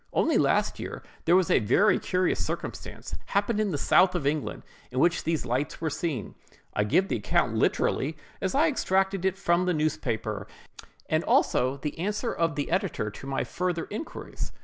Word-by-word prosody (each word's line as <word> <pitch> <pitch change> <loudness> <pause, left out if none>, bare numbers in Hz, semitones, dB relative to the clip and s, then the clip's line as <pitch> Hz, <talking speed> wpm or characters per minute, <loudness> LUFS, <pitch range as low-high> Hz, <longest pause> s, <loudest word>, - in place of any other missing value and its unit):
Only - - +3
last - - +2
year, - - -6 0.2
there 170 - +5
was 185 -2 +3
a - - +5
very 130 - +4
curious 185 0 0
circumstance - - -6
happened 205 +2 +1
in 215 -1 +1
the 155 - -1
south 185 +5 +4
of 160 -6 -1
England, 150 +1 -1 0.3
in 125 - -7
which 170 +5 +3
these 160 -5 0
lights 130 +4 -1
were 160 -2 -1
seen. 145 - -3 0.4
I 105 - +1
give 185 - +3
the - - 0
account 105 - +1
literally 150 +4 +1 0.2
as 190 +3 -1
I 305 +4 +5
extracted 195 - +1
it 190 0 +1
from 180 -1 +2
the 180 - +2
newspaper, 110 -9 -1 0.6
and - - +1
also 130 +2 +2
the 150 +3 -5
answer 210 +6 -1
of 165 -2 0
the 145 - -2
editor 180 - 0
to 135 - -10
my 135 - -1
further 180 -2 -2
inquiries. 220 +10 -6
170 Hz, 180 wpm, -27 LUFS, 140-190 Hz, 0.6 s, there